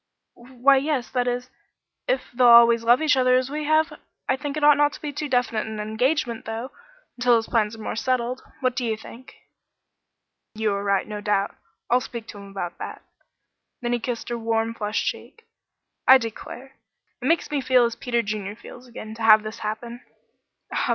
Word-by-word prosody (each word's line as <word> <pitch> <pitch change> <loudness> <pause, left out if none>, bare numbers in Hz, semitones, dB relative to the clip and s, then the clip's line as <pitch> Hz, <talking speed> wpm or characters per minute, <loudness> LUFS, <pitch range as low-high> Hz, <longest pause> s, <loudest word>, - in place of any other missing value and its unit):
"Why 255 +3 +2
yes 270 -3 -1
that 250 -1 0
is 245 +1 -3 0.6
if - - -1
they'll 245 0 +4
always 235 -1 +7
love 240 +6 +4
each 300 -2 +4
other 255 -1 +4
as 255 +1 0
we 300 +1 -3
have. 310 +1 +1 0.3
I 260 - +2
think 290 +1 -5
it 300 - -3
ought 295 0 +8
not 290 0 +3
to - - -9
be 295 -1 -5
too 295 +1 -4
definite 245 -4 0
an 220 -1 -6
engagement, 235 +3 -1
though, 225 +4 -5 0.5
until 245 -1 +4
his 225 -1 +1
plans 220 -2 0
are 220 - -10
more - - -3
settled. 250 +1 -1 0.2
What 255 -1 +1
do 255 - -2
you 225 -2 -1
think?" 240 +3 -13 1.2
"You 215 -1 0
are 200 0 -3
right, 200 -1 +1
no 210 -1 -6
doubt. 205 -1 0 0.3
I'll 250 +1 +3
speak 235 -3 -7
to 205 - -9
him 200 0 -11
about 175 -3 -6
that." - - -7 0.8
Then 240 0 0
he 240 - 0
kissed 235 0 -4
her 240 0 -3
warm, 225 0 0
flushed 210 -1 -2
cheek. 460 - -6 0.6
"I 265 - +10
declare, 255 +3 -8 0.4
it 250 - -2
makes 330 0 +1
me 290 -2 0
feel 255 -1 +4
as 235 - -1
Peter 235 -1 -1
Junior 205 -1 -4
feels 245 +2 -13
again, 220 -2 -9
to 225 - -10
have 215 -1 +7
this 215 +1 -7
happen." 230 +3 -5
240 Hz, 195 wpm, -24 LUFS, 220-260 Hz, 1.2 s, I